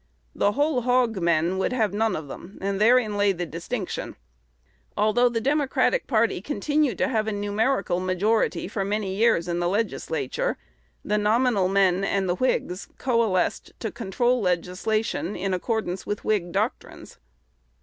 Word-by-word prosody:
The 205 - +1
"whole 285 -1 +1
hog 245 -3 +2
men" 170 +2 +1
would 190 - 0
have 220 -6 +1
none 220 +1 +1
of 155 -2 -6
them, 175 +7 -10
and 195 +1 -2
therein 225 -2 +4
lay 205 -1 +3
the 175 -1 -3
distinction. 175 +6 -5 0.8
Although 215 +4 +3
the 235 -1 -1
Democratic 290 - +1
party 225 -6 +1
continued 290 -1 0
to - - +1
have 220 -4 0
a - - 0
numerical 205 -1 0
majority 185 0 0
for 200 0 -2
many 200 -1 -2
years 215 -5 +2
in 175 0 -1
the 175 0 +1
Legislature, 230 - -2 0.5
the 210 0 +1
nominal 215 -2 +2
men 190 -1 +2
and 195 -1 0
the 175 - +2
Whigs 190 -6 -1
coalesced 230 -8 0
to - - -3
control 240 +3 0
legislation 185 +2 -1
in 190 +1 -2
accordance 190 -1 -2
with 205 - -4
Whig 195 -5 0
doctrines. - - -4
210 Hz, 150 wpm, -25 LUFS, 185-235 Hz, 0.8 s, therein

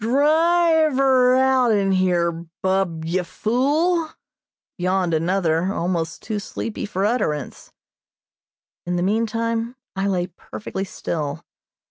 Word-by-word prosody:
"Drive 315 +4 +3
her 260 -2 +4
out'n 250 -7 +3
here, 180 -2 +2 0.3
Bub, 190 -4 0
ye 175 +3 0
fool!" 290 - 0 0.7
yawned 180 -1 0
another, 170 +1 +1
almost 170 -4 -2
too 215 -2 -3
sleepy 210 +1 -5
for 195 -1 -1
utterance. 205 - -2 1.1
In 175 0 -2
the 175 - 0
meantime 230 +3 -1 0.2
I 195 +1 -1
lay 180 -3 0
perfectly 195 +1 -7
still. 155 -6 -4
200 Hz, 105 wpm, -22 LUFS, 180-255 Hz, 1.1 s, her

